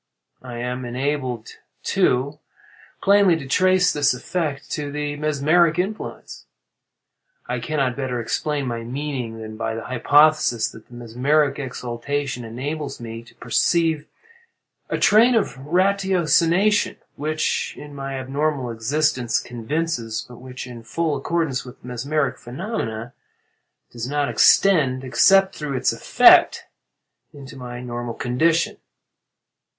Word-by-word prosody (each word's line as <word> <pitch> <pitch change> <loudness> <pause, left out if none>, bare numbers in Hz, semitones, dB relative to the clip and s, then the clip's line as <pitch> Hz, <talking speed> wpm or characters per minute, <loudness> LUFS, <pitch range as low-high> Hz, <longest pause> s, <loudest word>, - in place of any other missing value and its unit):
I 125 -2 -8
am 125 +1 -4
enabled, 125 -1 -3 0.3
too, 140 +4 +1 0.6
plainly 200 -3 +5
to 145 - -7
trace 185 +5 +3
this 145 -3 +2
effect 145 +1 -4
to 145 -1 -3
the 145 0 -3
mesmeric 155 +3 +2
influence. 195 +4 -5 1.0
I - - -2
cannot 135 -5 -1
better 130 -3 -3
explain 145 +5 -2
my 120 -2 -3
meaning 125 -2 -4
than 110 0 -8
by 115 0 -3
the 115 - -5
hypothesis 135 -1 +3
that 110 - -14
the 120 - -14
mesmeric 135 +5 0
exaltation 130 +1 -4
enables 140 +5 -5
me 115 -1 -7
to 115 - -19
perceive 155 +6 +1 0.8
a - - -1
train 235 +4 +5
of 220 - 0
ratiocination 185 +1 +2 0.2
which, 155 +1 -1
in 150 -1 -10
my 135 -1 -5
abnormal 135 -1 -2
existence, 125 +1 0
convinces, 120 -1 -3
but 120 - -12
which, 130 0 -8
in 120 -2 -9
full 155 +7 -2
accordance 145 -2 -1
with 125 - -12
the - - -13
mesmeric 140 +4 -2
phenomena, 120 - -5 0.8
does 120 +1 -5
not 145 0 0
extend, 140 -10 +4
except 195 +8 +4
through 145 -3 -3
its - - +1
effect, - - +5 0.7
into 140 -1 -11
my 125 -2 -7
normal 120 -1 -5
condition. 160 +7 +1
140 Hz, 125 wpm, -22 LUFS, 120-155 Hz, 1.0 s, plainly